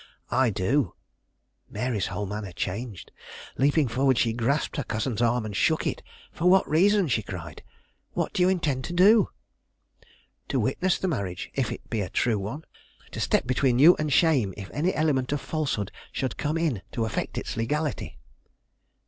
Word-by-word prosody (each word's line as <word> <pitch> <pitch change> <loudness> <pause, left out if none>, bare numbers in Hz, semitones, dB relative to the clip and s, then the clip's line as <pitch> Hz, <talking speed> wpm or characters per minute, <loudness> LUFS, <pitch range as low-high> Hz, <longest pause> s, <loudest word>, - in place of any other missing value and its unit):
"I 130 0 +3
do." 110 - 0 0.7
Mary's 120 -6 -2
whole 105 - -3
manner 100 -1 -5
changed. 100 +1 -5 0.5
Leaping 145 +1 +3
forward, 130 +2 +2
she 115 -2 +2
grasped 120 +6 0
her 140 - -1
cousin's 115 +1 -2
arm 120 -1 +2
and 105 -2 -5
shook 160 +8 +2
it. - - -2 0.3
"For 175 +2 +1
what 190 +1 +5
reason?" 195 +4 +3
she 115 -5 +1
cried. 85 -6 -8 0.5
"What - - -2
do - - 0
you 180 - +5
intend 150 -8 0
to 175 - -5
do?" 205 +5 +5 1.2
"To - - 0
witness 185 0 +1
the 190 - -2
marriage, 100 - -3
if 130 -6 -1
it - - -8
be 110 -3 0
a 95 - -3
true 110 +1 +1
one; 110 +11 -6 0.5
to - - -6
step - - +1
between 130 0 +2
you 160 +7 +8
and 155 -1 -1
shame 135 - +3
if 100 -2 -8
any 170 +6 +1
element 140 -5 +1
of 145 - -1
falsehood 135 -12 -2 0.2
should 130 -3 -2
come 150 +2 -1
in 155 - 0
to 115 -3 0
affect 110 - -3
its - - -4
legality." 140 - -2
130 Hz, 175 wpm, -26 LUFS, 110-155 Hz, 1.2 s, you